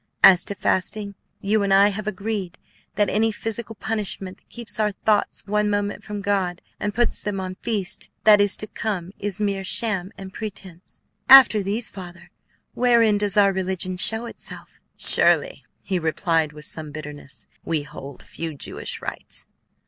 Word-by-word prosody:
As 185 -2 +8
to 200 - -2
fasting, 200 +2 -1 0.3
you 210 +2 +1
and 200 -1 0
I 200 +1 +6
have 210 +1 -5
agreed 200 -3 -4 0.4
that 205 - +2
any 220 +2 +1
physical 225 +1 -5
punishment 200 -4 -4
that - - -38
keeps 235 -2 -7
our 210 -1 +2
thoughts 210 0 0
one 210 +1 +1
moment 205 0 -2
from 210 -1 -6
God, 190 -3 0 0.2
and 205 - -1
puts 240 0 +1
them 205 -2 -3
on 185 -1 -4
the 185 - -12
feast 210 -5 -3
that 210 -1 +7
is 205 -1 +2
to - - -3
come, 195 -4 -4
is 205 -1 0
mere 200 -2 -1
sham 190 -2 +1
and 190 -1 -9
pretence. 195 -5 -8 0.3
After 260 -5 +9
these, 210 +4 -1
Father, 175 -2 -11 0.4
wherein 230 -4 +4
does 205 -1 +1
our 200 -1 +5
religion 185 -1 -2
show 220 +5 +4
itself?" - - -9 0.2
"Surely," - - +1 0.2
he 185 -2 -2
replied 160 -1 0
with 150 0 -8
some 155 -1 -4
bitterness, 145 -5 -9 0.2
"we 160 -3 -1
hold 140 -2 -10
few 165 -2 -6
Jewish - - -4
rites. - - -7
200 Hz, 165 wpm, -23 LUFS, 180-215 Hz, 0.4 s, After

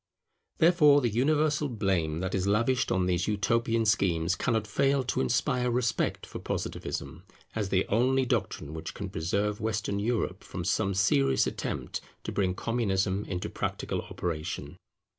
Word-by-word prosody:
Therefore 160 -4 +6
the 125 -4 +1
universal 150 +4 +2
blame 95 -8 0
that 95 0 -2
is 95 0 0
lavished 115 +5 +2
on 95 -1 +2
these 90 -2 0
utopian 115 +2 +1
schemes 90 -5 +2
cannot 110 -3 0
fail 135 +6 +2
to 125 - -1
inspire 125 - +1
respect 120 -1 0
for - - -8
Positivism, - - -4 0.3
as 105 -3 -2
the 95 -1 +1
only 130 +4 +2
doctrine 75 - -2
which 80 0 -6
can 100 -2 -5
preserve 100 +6 -1
Western 105 -2 -1
Europe 115 +2 -1
from - - -6
some 95 0 +1
serious 70 -9 +3
attempt - - -4 0.2
to - - -4
bring 95 -2 0
Communism 100 -4 0
into 90 -2 -3
practical - - -3
operation. 80 -3 -4
105 Hz, 145 wpm, -29 LUFS, 95-125 Hz, 0.3 s, Therefore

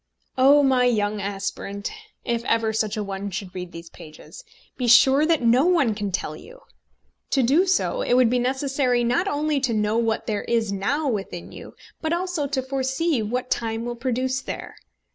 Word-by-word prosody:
Oh, 280 +2 +6
my 260 -2 +3
young 210 -3 0
aspirant, 200 0 -4 0.3
if 235 -2 -1
ever 225 -2 +1
such 215 0 -1
a 210 - -1
one 200 0 -5
should 190 -1 -6
read 180 -1 -6
these 165 0 -10
pages, 165 - -13 0.3
be 250 - -2
sure 265 +5 +6
that 325 -6 +2
no 245 +7 +4
one 325 -11 +3
can 205 -1 -4
tell 185 - -3
you! - - -14 0.7
To 270 - +2
do 305 +11 +3
so 375 +6 +1
it 245 - +1
would 250 -2 +4
be 250 - +2
necessary 260 -1 0
not 250 +11 +1
only 295 -2 0
to 255 -4 0
know 210 +1 +1
what 225 -1 -1
there 210 -2 -2
is 225 -3 0
now 265 +11 -1
within 195 -7 -4
you, - - -11 0.3
but 320 +1 -1
also 350 -4 -1
to 270 -2 -2
foresee 265 +2 -1
what 245 +4 -3
time 225 0 -1
will 240 0 -4
produce 255 +2 -1
there. - - -7
245 Hz, 185 wpm, -23 LUFS, 210-275 Hz, 0.7 s, Oh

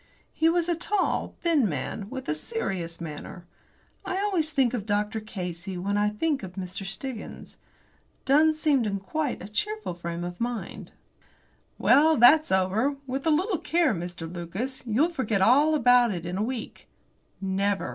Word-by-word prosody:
He 320 +1 +3
was 340 0 +1
a 345 - +2
tall, 365 +3 -1
thin 310 - +3
man, 165 +7 -4
with 260 0 -6
a 150 - +1
serious 170 - -4
manner. 170 +2 -8 0.6
I 375 -1 -3
always 380 -6 0
think 265 -5 +2
of 220 -4 -3
Dr. 210 +1 0
Casey 180 -3 -6
when 200 +3 -1
I 205 0 +2
think 280 +7 -1
of 185 -3 -8
Mr. 190 0 -6
Stiggins. 225 +5 -6 0.7
Dunn 305 +4 +5
seemed 290 -7 +2
in 200 -1 -2
quite 290 +7 -3
a - - -7
cheerful 420 - -2
frame 170 0 -5
of 175 +2 -6
mind. 240 -1 -4 0.9
"Well, 310 +4 +5
that's 300 +7 +6
over. 195 +9 +2
With 270 +4 -3
a - - +5
little 355 +4 +1
care, 330 -5 +2
Mr. 175 -2 -5
Lucas, 185 +11 -5
you'll 260 +10 +2
forget 230 - -1
all 285 +10 +5
about 245 -3 +5
it 175 -3 -4
in 175 +1 -3
a 195 - -1
week." 240 0 -5 0.5
Never! 195 +1 -1
230 Hz, 165 wpm, -26 LUFS, 190-305 Hz, 0.9 s, that's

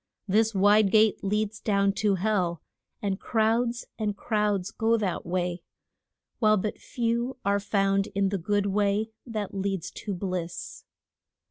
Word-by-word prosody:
This 220 +2 +2
wide 205 +1 +5
gate 215 +1 +3
leads 210 +2 -1
down 200 -2 +2
to 205 -2 +3
hell, 185 -4 0 0.4
and 195 -1 -1
crowds 235 +2 +1
and 210 -2 -1
crowds 210 -4 0
go 225 +1 +2
that 195 -5 -2
way, 180 0 -1 0.8
while 215 -2 +4
but 210 +2 -3
few 240 +2 -2
are 200 0 +2
found 195 0 +1
in 195 -1 +2
the 195 -1 -2
good 205 +3 0
way 205 +2 +1 0.2
that 215 -4 -4
leads 195 -2 -2
to 205 -3 -5
bliss. 180 -2 -5
205 Hz, 140 wpm, -27 LUFS, 195-215 Hz, 0.8 s, wide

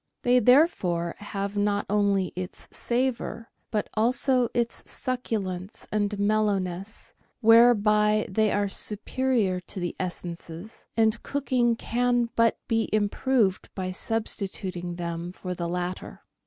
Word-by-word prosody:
They 250 +1 +5
therefore 200 - +3
have 200 -1 -4
not 205 0 +1
only 200 -3 +1
its 185 0 -6
savour, 235 -2 -2 0.2
but 210 -2 -1
also 245 +2 +2
its 235 -1 -1
succulence 210 -7 -4
and 205 -1 0
mellowness, 200 -2 -1 0.3
whereby 215 -2 +5
they 215 +2 +1
are 205 0 +1
superior 210 -1 0
to 185 +2 -7
the 175 -1 -3
essences, 175 +1 -6
and 220 0 +3
cooking 255 -4 +1
can 245 0 0
but 230 -1 +3
be 225 -1 +1
improved 215 0 +1
by 185 -1 -3
substituting 190 -4 -3
them 170 0 -4
for 180 -1 -5
the 170 -1 -3
latter. 180 +1 -4
210 Hz, 115 wpm, -26 LUFS, 185-230 Hz, 0.3 s, They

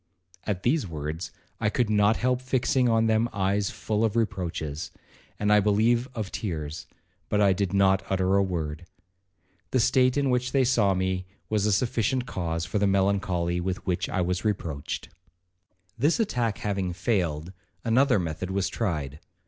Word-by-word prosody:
At 100 -3 -2
these 135 -2 +1
words 80 +1 -5 0.3
I 105 - +1
could 120 +2 +1
not 105 +1 +3
help 125 +1 +1
fixing 130 -1 +1
on 115 0 +3
them 110 +1 +2
eyes 100 +1 0
full 110 0 -2
of 110 -1 +1
reproaches, 85 -9 -2 0.5
and 105 0 +2
I 105 - +6
believe 110 +4 +2
of 110 -4 -4
tears,—but 80 +3 -5
I 100 -2 +5
did 95 0 -1
not 95 -1 +3
utter 95 0 +2
a 100 - +4
word. 85 -4 -3 0.8
The 130 - +1
state 125 +2 +3
in 140 -2 +2
which 125 0 0
they 135 -1 +4
saw 115 -6 +3
me, 95 0 -1 0.2
was 105 -1 +1
a - - +2
sufficient 120 +3 +1
cause 85 -6 -3
for 95 +3 -1
the 100 - +3
melancholy 95 -3 +1
with 95 +1 -3
which 90 -2 -1
I 95 - 0
was 90 +1 -1
reproached. 85 -9 -3 0.9
'This 150 - +2
attack 120 - 0
having 95 -3 -2
failed, 90 -4 -1 0.3
another 125 +2 +4
method 90 0 -3
was 95 0 0
tried. 75 - -3
100 Hz, 160 wpm, -26 LUFS, 90-115 Hz, 0.9 s, I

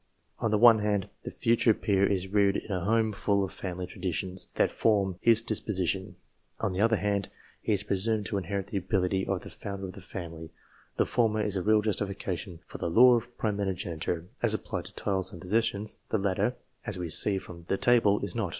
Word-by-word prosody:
On 115 - 0
the 105 - +2
one 115 0 +7
hand, 105 -1 0
the - - -6
future 115 -2 +2
peer 100 -2 +2
is 95 -1 -1
reared 100 0 +3
in - - -7
a 90 -3 -1
home 110 +1 +2
full 100 0 +1
of 95 - -4
family 90 -1 -5
traditions, 90 +1 -3
that - - +2
form 100 -4 +2
his 115 -1 +5
disposition. 95 -4 -1 0.4
On 100 - -1
the 95 - -1
other 115 +1 +4
hand, 100 -2 -1 0.3
he 110 - 0
is 100 0 -1
presumed 105 +1 0
to 100 -1 -1
inherit 95 +1 -3
the 100 0 -2
ability 95 0 0
of 95 -2 -1
the - - -10
founder 100 -1 -6
of 95 - -7
the 100 - -11
family. 85 -3 -7 0.5
The - - +3
former 110 -3 +1
is 105 -1 -1
a 95 - 0
real 105 +2 +3
justification 95 -4 -3
for - - -9
the - - -1
law 125 +8 +7
of 120 +1 -2
primogeniture, 90 -5 -2 0.2
as - - +3
applied - - -4
to - - -12
titles 95 -2 -1
and 85 - -10
possessions; 105 +2 -1
the - - +1
latter, 100 +4 0 0.3
as 105 -5 -3
we 90 -1 -3
see 95 +5 +3
from 85 -2 -9
the 95 - 0
table, 115 -4 +4
is 100 -3 -2
not. 110 -6 -1
100 Hz, 205 wpm, -29 LUFS, 95-110 Hz, 0.5 s, one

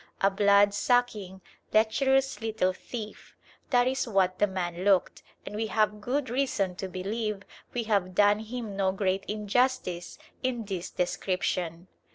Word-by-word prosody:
A 195 - +3
blood 200 0 +5
sucking, 205 -4 0 0.3
lecherous 265 +2 +2
little 220 -4 0
thief: 215 +2 -8 0.3
that 245 -2 +4
is 260 0 0
what 190 -4 +1
the 205 - +4
man 180 -2 -3
looked, 195 -2 +2 0.2
and - - -7
we 220 +1 -1
have 215 -1 +1
good 265 +6 -1
reason 240 -8 0
to 190 - -4
believe 200 +2 -3 0.3
we 240 - -2
have 200 -4 0
done 205 +1 +5
him 220 -2 -6
no 195 -1 +2
great 195 0 0
injustice 210 -3 -1 0.2
in 245 -4 -2
this 190 -3 -4
description. 180 -1 -2
205 Hz, 145 wpm, -28 LUFS, 190-230 Hz, 0.3 s, blood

